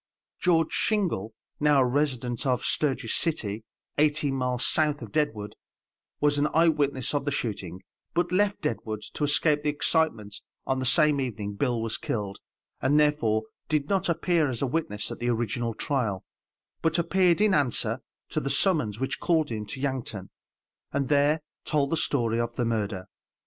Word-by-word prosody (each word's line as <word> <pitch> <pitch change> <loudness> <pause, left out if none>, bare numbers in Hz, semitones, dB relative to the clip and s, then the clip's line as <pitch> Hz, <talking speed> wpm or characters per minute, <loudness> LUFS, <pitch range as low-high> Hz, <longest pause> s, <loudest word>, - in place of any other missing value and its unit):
George 165 -3 +3
Shingle, 165 - 0 0.2
now 150 -2 +4
a - - +4
resident 125 -3 0
of 125 -1 +1
Sturgis 130 -6 0
City, 110 - -1 0.4
eighteen 150 -1 +2
miles 125 -2 0
south 150 -1 +1
of - - -9
Deadwood, 110 -10 -1 0.7
was 145 0 +2
an 145 - +3
eye 165 +1 +6
witness 140 -4 0
of 145 - 0
the 145 - -1
shooting, 95 -8 -4 0.3
but 175 +1 +1
left 200 +2 +2
Deadwood 110 -2 -3
to - - -3
escape 145 +1 +3
the 150 - 0
excitement 145 -9 0 0.2
on 130 0 0
the 130 - -1
same 150 0 +4
evening 105 -5 -3
Bill 120 +2 0
was 115 -1 -2
killed, 100 -3 -3 0.4
and 145 +3 +4
therefore 135 -8 +2 0.3
did 150 -2 0
not 195 -2 +1
appear 170 -2 +2
as 125 0 -3
a - - +3
witness 120 -7 -2
at - - -6
the 120 - 0
original 115 0 -1
trial, 115 -10 -1 0.6
but 160 +1 +1
appeared 175 +1 +3
in 210 -2 +4
answer 140 -7 +1 0.3
to - - -1
the 140 - -3
summons 135 - +1
which 135 +1 -1
called 160 -6 +1
him 105 -2 -4
to 130 - -6
Yankton, 125 -8 -3 0.6
and 140 -1 -1
there 145 +2 +3 0.2
told 140 -2 0
the - - +3
story 120 -7 0
of 120 0 -2
the 120 - 0
murder. 105 -5 -1
140 Hz, 170 wpm, -27 LUFS, 115-155 Hz, 0.7 s, eye